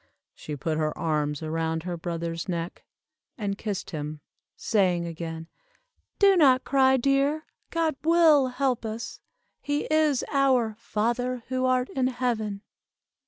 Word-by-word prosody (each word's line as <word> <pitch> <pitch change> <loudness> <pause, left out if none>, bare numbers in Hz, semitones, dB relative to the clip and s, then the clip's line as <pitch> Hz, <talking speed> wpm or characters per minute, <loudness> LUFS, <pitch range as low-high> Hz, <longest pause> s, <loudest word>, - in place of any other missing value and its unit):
'" - - -62
She 150 - -7
put 155 +2 -2
her 155 -1 -1
arms 150 -2 -1
around 160 0 -2
her 180 0 -3
brother's 170 +1 -4
neck, 170 0 -4 0.5
and 205 -4 -2
kissed 205 -2 -4
him, 150 -1 -5 0.4
saying 180 -5 +1
again, 165 -1 -6 0.7
"Do 395 -1 +6
not 265 -7 +5
cry, 265 -1 +4
dear, 275 +4 +1 0.2
God 330 -2 0
will 320 -4 +5
help 255 -1 -1
us, 225 +1 -6 0.4
he 290 +1 -1
is 305 -4 +3
our 260 -5 +3
'Father 240 +3 -1
who 255 0 0
art 255 0 +1
in 260 -1 +1
heaven. 225 -5 -2
230 Hz, 135 wpm, -26 LUFS, 170-270 Hz, 0.7 s, Do